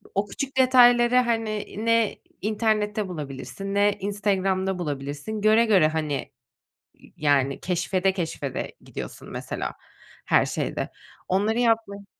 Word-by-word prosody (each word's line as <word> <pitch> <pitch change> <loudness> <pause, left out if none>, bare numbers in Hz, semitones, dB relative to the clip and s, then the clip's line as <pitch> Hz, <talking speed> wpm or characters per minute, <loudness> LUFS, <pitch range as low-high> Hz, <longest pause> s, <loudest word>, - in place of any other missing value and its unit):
o 200 +1 +1
küçük 270 +3 -5
detayları, 245 -1 +6
hani, 225 -4 0
ne 230 -2 +2 0.2
internette 215 -1 0
bulabilirsin 160 +4 -6
ne 205 0 +3
Instagram'da 195 -2 0
bulabilirsin. 145 +6 -4
Göre 215 +2 +5
göre, 190 -8 +5
hani, 155 -3 -3 0.9
yani, 140 -2 +1
keşfede 185 +2 0
keşfede 165 -7 -4
gidiyorsun, - - -8
mesela, - - -4 0.5
her - - +3
şeyde. - - -3 0.4
Onları 205 +5 +1
yapmaya 225 -4 +1
200 Hz, 110 wpm, -25 LUFS, 175-220 Hz, 0.9 s, detayları